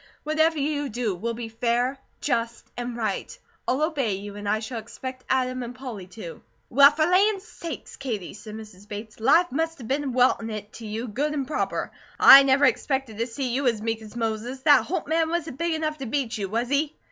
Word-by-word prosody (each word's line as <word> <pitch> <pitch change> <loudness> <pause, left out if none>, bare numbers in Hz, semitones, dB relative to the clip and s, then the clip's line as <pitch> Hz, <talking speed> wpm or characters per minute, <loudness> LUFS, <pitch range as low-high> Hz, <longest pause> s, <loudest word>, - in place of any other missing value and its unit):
Whatever 315 +1 +2
you 290 0 -1
do 225 -2 -1
will 230 +6 -3
be 235 0 -5
fair, 240 +4 0 0.2
just, 230 0 -1
and 245 -1 -4
right. 215 -4 -3 0.3
I'll 265 +4 +1
obey 280 -9 0
you, 200 +1 -8
as 205 0 -6
I 210 +1 +2
shall 225 +2 -5
expect 255 +3 -8
Adam 255 -1 +1
and 245 0 -6
Polly 240 -8 -7
to." 180 -3 -9 0.3
"Well, 280 +3 +9
for 305 +1 +1
lands 390 +3 +3
sakes, 335 -7 -8
Katie," 220 -10 -4
said 215 +1 -9
Mrs. 210 -2 -11
Bates. 215 +2 -8
"Life 305 +9 +4
must 325 +3 -1
a - - -8
been 270 +3 -1
weltin' 250 -2 +2
it 215 -1 -6
to 225 - -8
you 220 +3 -4
good 290 +8 -1
and 275 -2 -1
proper. 300 - -2 0.3
I 275 - +11
never 275 +1 +4
expected 265 -8 0
to 230 - 0
see 255 +2 -3
you 270 +1 +1
as 230 -3 +2
meek 225 0 -1
as 215 +1 -12
Moses. 230 +3 -3
That 290 -1 +6
Holt 355 -1 -2
man 320 +1 +1
wasn't 325 -5 -3
big 335 -1 0
enough 310 -1 -2
to 270 - -4
beat 250 -1 -1
you, 200 -4 -3
was 235 +4 -1
he?" 290 +2 0
250 Hz, 210 wpm, -25 LUFS, 225-290 Hz, 0.3 s, I